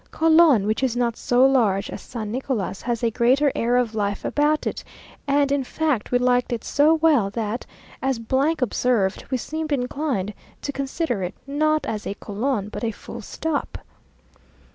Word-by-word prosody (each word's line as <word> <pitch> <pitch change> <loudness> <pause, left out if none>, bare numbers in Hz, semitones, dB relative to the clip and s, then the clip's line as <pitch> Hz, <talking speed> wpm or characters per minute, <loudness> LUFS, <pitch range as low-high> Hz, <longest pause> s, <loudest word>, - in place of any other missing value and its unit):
Colon, 315 -9 +5
which 215 +3 0
is 250 -3 0
not 235 -2 +1
so 250 +1 +3
large 220 -7 +3
as - - -7
San 220 -4 -6
Nicolas, 240 -6 -3
has 240 -1 -2
a 230 - +2
greater 260 +5 +3
air 240 +2 +1
of 240 -3 0
life 205 -2 -2
about 300 +1 +1
it; - - -3 0.4
and 280 0 +2
in 280 -1 +1
fact 290 -3 -1
we 245 - +4
liked 250 0 +2
it 235 -2 -2
so 300 +3 +4
well, 305 -10 +3
that, 220 +2 -4 0.3
as 265 -3 0 0.4
observed, 225 -4 0
we 260 - 0
seemed 310 +4 -4
inclined 250 -6 -1 0.3
to 285 - -2
consider 275 - -2
it, 180 0 -4
not 310 +2 +1
as 210 -1 -4
a 200 - -3
colon, 210 +1 -2
but 215 - -7
a 230 - +1
full 220 - -8
stop. 320 -3 -3
250 Hz, 170 wpm, -23 LUFS, 220-285 Hz, 0.4 s, Colon